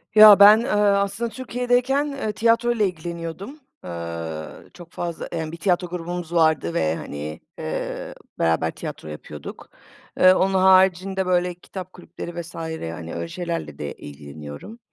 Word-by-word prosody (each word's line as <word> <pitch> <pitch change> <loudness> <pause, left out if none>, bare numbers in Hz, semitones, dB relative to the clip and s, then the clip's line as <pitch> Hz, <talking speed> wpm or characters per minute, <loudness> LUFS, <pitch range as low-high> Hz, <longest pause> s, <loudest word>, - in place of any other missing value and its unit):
Ya 215 -2 +10
ben, 210 +2 +9
ııı, 210 -5 +3
aslında 200 +4 -1
Türkiye'deyken, 250 +3 0 0.2
ııı, 215 - -1
tiyatroyla 230 0 +2
ilgileniyordum, 170 - -6 0.2
eee, 85 -2 -5 0.2
çok 175 -1 -13
fazla, 170 -1 -4
emm, 160 -2 -4
bir 170 - -7
tiyatro 180 +1 +1
grubumuz 175 -1 -5
vardı 160 - +2
ve, 80 0 +1
hani, 75 0 -6 0.2
eee, 80 0 -4 0.2
beraber 80 0 +1
tiyatro 80 - -8
yapıyorduk. 75 0 -9 0.5
Eee, 185 0 +8
onun 190 +1 +1
haricinde 190 0 +4
böyle 180 0 +1
kitap 185 +1 -9
kulüpleri 175 -1 -7
vs. 170 +1 -12
hani, 90 - -5
öyle 85 0 -4
şeylerle 165 - -5
de 70 -1 -5
ilgileniyorum. 75 - -10
175 Hz, 135 wpm, -23 LUFS, -, 0.5 s, Ya